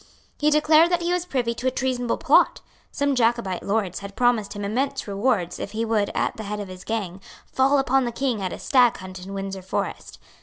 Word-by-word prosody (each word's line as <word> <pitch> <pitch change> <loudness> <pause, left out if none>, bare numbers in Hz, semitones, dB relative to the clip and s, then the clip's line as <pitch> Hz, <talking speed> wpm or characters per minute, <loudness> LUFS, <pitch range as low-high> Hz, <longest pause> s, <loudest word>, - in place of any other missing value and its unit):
He 300 - +3
declared 310 +2 +5
that 350 -1 0
he 350 +1 +1
was 360 0 -1
privy 245 -6 -1
to 245 +3 -3
a - - +5
treasonable 250 -2 -1
plot. - - +3 0.3
Some 285 0 0
Jacobite 230 -6 +1
lords 200 -3 -1
had 200 0 -9
promised 235 -3 +1
him 205 -1 -5
immense 265 +6 -2
rewards 200 -3 0
if - - -6
he 225 +1 -1
would, 215 -3 +1
at - - -1
the 220 - -5
head 210 +1 -4
of 200 -2 -6
his 185 0 -10
gang, 195 -5 -4 0.2
fall 270 +2 +2
upon 270 -1 +2
the 240 - -2
King 240 -3 -1
at 185 -2 -2
a - - -5
stag 245 -3 +3
hunt 185 -1 -9
in 195 +1 -7
Windsor 195 -1 -5
Forest. 185 - -4
230 Hz, 220 wpm, -24 LUFS, 200-265 Hz, 0.3 s, declared